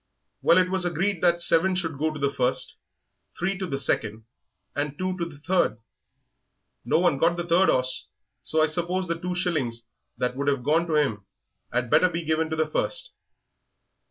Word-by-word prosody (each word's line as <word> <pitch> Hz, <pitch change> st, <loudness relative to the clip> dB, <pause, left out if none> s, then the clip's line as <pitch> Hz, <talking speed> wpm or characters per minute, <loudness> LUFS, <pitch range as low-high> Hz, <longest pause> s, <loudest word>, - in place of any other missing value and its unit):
Well, -, -, +5 dB
it 185 Hz, 0 st, +3 dB
was 190 Hz, -1 st, +2 dB
agreed 175 Hz, +2 st, -1 dB
that 175 Hz, -1 st, +3 dB
seven 185 Hz, +3 st, +3 dB
should 165 Hz, -6 st, -3 dB
go 155 Hz, +1 st, +1 dB
to 155 Hz, -, -7 dB
the 140 Hz, 0 st, 0 dB
first, 130 Hz, -1 st, 0 dB, 0.6 s
three 190 Hz, +3 st, -1 dB
to 190 Hz, -, -3 dB
the 135 Hz, -, -2 dB
second, 110 Hz, -4 st, -1 dB, 0.5 s
and 145 Hz, 0 st, -2 dB
two 185 Hz, 0 st, -2 dB
to 170 Hz, -, 0 dB
the 160 Hz, -4 st, -10 dB
third. 175 Hz, -5 st, +1 dB, 1.1 s
No -, -, +2 dB
one 170 Hz, -5 st, +2 dB
got 170 Hz, +2 st, +2 dB
the 175 Hz, -, -3 dB
third 175 Hz, +3 st, +4 dB
'orse, 130 Hz, 0 st, +1 dB, 0.3 s
so 155 Hz, 0 st, +2 dB
I -, -, +6 dB
suppose 175 Hz, +4 st, -1 dB
the 165 Hz, 0 st, -2 dB
two 180 Hz, 0 st, -3 dB
shillings 140 Hz, -11 st, -1 dB, 0.3 s
that 125 Hz, 0 st, -1 dB
would 140 Hz, +1 st, -3 dB
have 140 Hz, -3 st, +1 dB
gone 160 Hz, +5 st, +2 dB
to 160 Hz, -, 0 dB
him 110 Hz, -10 st, 0 dB, 0.4 s
'ad 125 Hz, -1 st, -1 dB
better 170 Hz, +4 st, +5 dB
be 170 Hz, -1 st, -4 dB
given 160 Hz, +1 st, 0 dB
to 160 Hz, -, -2 dB
the 160 Hz, 0 st, +1 dB
first." -, -, -1 dB
160 Hz, 190 wpm, -25 LUFS, 140-180 Hz, 1.1 s, I